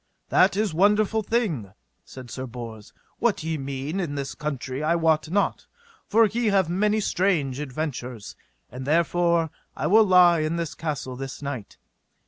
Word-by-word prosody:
That 190 +1 +4
is 210 -5 0
wonderful 210 +5 +3
thing, 185 - -1 0.3
said 125 -2 -11
Sir 130 0 -5
Bors. 115 -3 -9 0.3
What 230 -8 +1
ye 160 -1 -2
mean 140 +6 -4
in 160 -6 -3
this 140 -1 -4
country 135 -2 -4
I 165 +2 +2
wot 160 -2 +2
not, 200 +3 0 0.4
for 225 +2 +5
ye 225 +3 -1
have 195 -4 +3
many 210 +4 +2
strange 170 -10 0
adventures, 125 - -5 0.4
and 130 +2 -7
therefore 170 0 +2 0.3
I - - -2
will 220 +3 +6
lie 180 -3 +6
in 155 +2 -1
this 170 -3 -3
castle 145 -5 -4
this 135 +2 -7
night. 130 -7 -6
160 Hz, 155 wpm, -25 LUFS, 135-195 Hz, 0.4 s, will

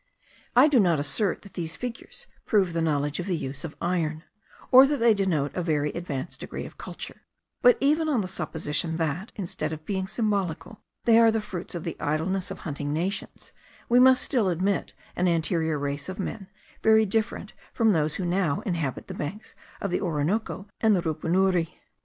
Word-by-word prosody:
I 255 +4 +8
do 285 -5 +4
not 175 -7 +3
assert 185 +7 -1
that 200 - -14
these 165 -2 -4
figures 250 - -7 0.2
prove 195 -6 +2
the 165 - 0
knowledge 145 -1 0
of 180 - -4
the 180 -3 0
use 135 -1 -6
of 160 -2 -6
iron, 165 -3 -1 0.5
or 260 +2 +9
that 290 +1 0
they 230 -2 +5
denote 175 -8 0
a 180 - -1
very 150 -3 0
advanced 170 -3 -5
degree - - -6
of - - -11
culture; - - -8 0.4
but 245 - +6
even 310 +3 +2
on 260 -7 +2
the 185 - -3
supposition 160 -3 -1
that, 165 +5 -2
instead 170 -5 -3
of 155 0 -7
being 190 0 -2
symbolical, 205 -3 -2 0.2
they 230 -1 +6
are 230 -1 +7
the 225 0 +1
fruits 185 -3 -6
of 170 - -4
the 165 - -4
idleness 170 +6 -1
of - - -7
hunting 145 -2 -4
nations, 175 +7 -3 0.4
we 245 +1 +6
must 260 0 +6
still 235 -9 +2
admit 185 +2 -1 0.2
an 180 - +1
anterior 160 -2 +1
race 140 +2 -3
of 185 - -5
men, 195 0 -5 0.3
very 220 0 +5
different 220 +2 -2 0.2
from 225 -2 +3
those 155 -4 +1
who 185 - -3
now 175 -4 0
inhabit 165 -9 -3
the - - -7
banks 185 +9 -6 0.3
of 200 - -3
the - - 0
Orinoco 185 +5 -1
and 220 -2 +4
the 175 - 0
Rupunuri. 175 +2 +1
180 Hz, 190 wpm, -26 LUFS, 160-215 Hz, 0.5 s, or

